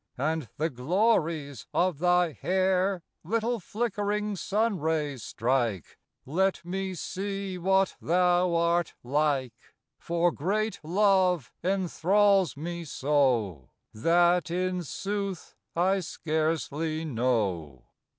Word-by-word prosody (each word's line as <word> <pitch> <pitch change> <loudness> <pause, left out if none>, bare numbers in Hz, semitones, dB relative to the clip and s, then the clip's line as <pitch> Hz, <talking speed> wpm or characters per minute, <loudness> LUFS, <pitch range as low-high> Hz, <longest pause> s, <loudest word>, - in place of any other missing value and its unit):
And 155 -2 -1
the 160 +3 0
glories 155 - 0
of 175 -4 +1
thy 180 -1 +3
hair 185 - 0 0.2
Little 230 +6 -1
flickering 210 0 -2
sun: 205 +1 0
rays 150 -4 -1
strike, 115 - -1 0.3
Let 185 +5 0
me 190 +1 -3
see 195 +1 -4
what 190 +2 +2
thou 180 0 +2
art 170 0 +1
like; 135 -2 0 0.5
For 170 +1 +1
great 210 +9 -1
love 180 - +2
enthralls 190 -1 +2
me 170 +3 -5
so, 130 - 0 0.2
That, 170 +6 +3
in 180 +1 -1
sooth, 195 +2 -4 0.2
I 190 +3 +2
scarcely 160 -1 -2
know. 105 - -1
175 Hz, 100 wpm, -28 LUFS, 150-190 Hz, 0.5 s, thy